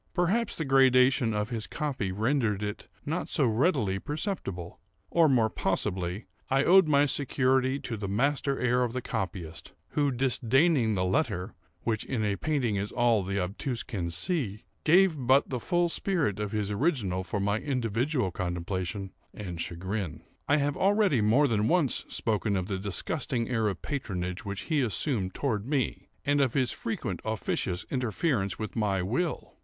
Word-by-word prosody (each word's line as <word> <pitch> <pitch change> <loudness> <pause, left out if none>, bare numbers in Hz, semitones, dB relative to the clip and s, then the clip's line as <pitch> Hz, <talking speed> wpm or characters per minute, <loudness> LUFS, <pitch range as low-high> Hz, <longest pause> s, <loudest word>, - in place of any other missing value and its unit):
Perhaps 195 +6 +1
the 160 - -3
gradation 130 -2 +4
of 105 +1 -1
his 115 -2 -3
copy 140 - -2
rendered 110 0 0
it 105 0 -5 0.2
not 160 +5 -2
so 145 - +2
readily 110 - +1
perceptible; 145 - -4 0.3
or, 165 -2 +5
more 120 -5 +4
possibly, 95 -2 -2 0.2
I 135 +1 +3
owed 185 +1 +6
my 145 -1 +4
security 130 -1 +1
to 115 - -4
the 100 -1 -4
master 135 +6 0
air 125 0 +2
of 120 -2 -2
the 130 - -2
copyist, 85 -4 -5 0.2
who, 145 -1 +1
disdaining 130 0 +2
the 95 -1 0
letter, 90 0 0 0.3
(which 110 -2 -1
in 115 -5 -2
a 100 -1 +1
painting 130 -6 0
is 100 +2 -3
all 120 -3 +3
the 100 +1 -2
obtuse 115 +7 -3
can 95 -9 -3
see,) 105 - -2 0.2
gave 180 +1 +5
but 130 +3 +3
the 125 - -1
full 175 +5 +1
spirit 165 - 0
of 105 -1 -2
his 105 -2 -1
original 105 - 0
for 100 +3 -3
my 100 +2 +1
individual 125 -3 -1
contemplation 90 +2 -3 0.2
and 90 -5 -5
chagrin. 95 -1 -4 0.2
I 145 - +4
have 145 -1 0
already 195 - +3
more 120 +8 +4
than 110 -3 +1
once 165 -5 +1
spoken 105 -2 0
of 90 - -1
the 95 -1 -3
disgusting 115 - -1
air 115 -3 +1
of 95 -4 -3
patronage 90 -11 -3
which 100 -1 -4
he 155 -3 0
assumed 110 -4 -1
toward 110 -6 -1
me, 140 -3 -1 0.2
and 145 0 +3
of 130 -2 +1
his 130 -3 +2
frequent 95 -5 -4
officious 95 -4 -2
interference 125 - 0
with 110 -1 -5
my 100 -5 +1
will. 150 - -2
115 Hz, 165 wpm, -28 LUFS, 100-140 Hz, 0.3 s, owed